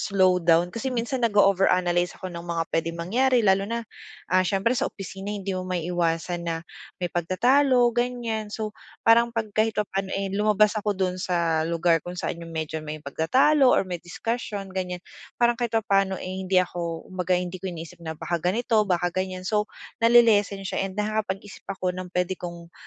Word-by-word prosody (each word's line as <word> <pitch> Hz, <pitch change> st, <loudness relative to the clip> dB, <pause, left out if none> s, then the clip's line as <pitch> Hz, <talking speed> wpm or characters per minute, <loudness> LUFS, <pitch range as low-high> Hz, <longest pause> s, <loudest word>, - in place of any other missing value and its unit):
Slow 185 Hz, -2 st, +3 dB
down 170 Hz, +1 st, +3 dB
kasi, 230 Hz, +6 st, -3 dB
minsan 250 Hz, +1 st, -2 dB
nag 230 Hz, -3 st, +1 dB
over 195 Hz, -1 st, +5 dB
analyze 175 Hz, 0 st, +1 dB
ako 185 Hz, -1 st, -7 dB
ng 170 Hz, -, -6 dB
mga 170 Hz, -1 st, -2 dB
puwedeng 165 Hz, +1 st, -1 dB
mangyari 240 Hz, +8 st, +2 dB
lalo 195 Hz, +1 st, +3 dB
na, 235 Hz, 0 st, -3 dB, 0.5 s
ah, 185 Hz, -, +5 dB
siyempre 195 Hz, +5 st, +1 dB
sa 255 Hz, -, 0 dB
opisina 195 Hz, 0 st, -8 dB
hindi 200 Hz, -2 st, -3 dB
mo 185 Hz, -, -2 dB
maiiwasan 170 Hz, 0 st, -1 dB
na 165 Hz, 0 st, -3 dB, 0.3 s
may 175 Hz, -2 st, -4 dB
pagtatalo, 245 Hz, -, +3 dB
ganyan. 240 Hz, -3 st, -2 dB
So, 215 Hz, 0 st, -4 dB, 0.3 s
parang 235 Hz, +1 st, +4 dB
pag 215 Hz, -2 st, -2 dB
kahit 215 Hz, +1 st, +1 dB
papaano, 195 Hz, -2 st, -1 dB
eh, 195 Hz, -1 st, -2 dB
lumabas 210 Hz, +1 st, +3 dB
ako 205 Hz, -1 st, -1 dB
do'n 185 Hz, -1 st, -1 dB
sa 170 Hz, -3 st, +1 dB
lugar 170 Hz, 0 st, +2 dB
kung 175 Hz, +3 st, -8 dB
saan 175 Hz, -1 st, -3 dB
yung 170 Hz, -, -8 dB
medyo 160 Hz, 0 st, -3 dB
may 155 Hz, 0 st, -7 dB
pagtatalo 260 Hz, -, +3 dB
or -, -, +4 dB
may 180 Hz, -2 st, -5 dB
discussion 200 Hz, +1 st, -4 dB
ganyan. 180 Hz, -1 st, -4 dB, 0.3 s
Parang 240 Hz, 0 st, +4 dB
kahit 235 Hz, -1 st, -2 dB
papaano, 195 Hz, -3 st, +2 dB
eh, 185 Hz, -, -6 dB
hindi 190 Hz, 0 st, 0 dB
ako 170 Hz, -2 st, -1 dB
kumbaga 180 Hz, 0 st, +1 dB
hindi 180 Hz, 0 st, -4 dB
ko 190 Hz, -, -4 dB
iniisip 165 Hz, -1 st, -8 dB
na 160 Hz, -1 st, -6 dB
baka 170 Hz, +2 st, -2 dB
ganito, 215 Hz, +5 st, +2 dB
baka 175 Hz, -1 st, +1 dB
ganyan 185 Hz, 0 st, -3 dB
so, 210 Hz, +2 st, 0 dB, 0.3 s
nale-lessen 225 Hz, -4 st, +4 dB
siya 195 Hz, +1 st, -2 dB
and 190 Hz, -, -11 dB
nakakapag-isip 210 Hz, -2 st, -3 dB
ako 185 Hz, -2 st, -2 dB
ng 185 Hz, 0 st, -6 dB
puwede 180 Hz, +1 st, +1 dB
kong 170 Hz, -2 st, -8 dB
190 Hz, 185 wpm, -25 LUFS, 175-215 Hz, 0.5 s, over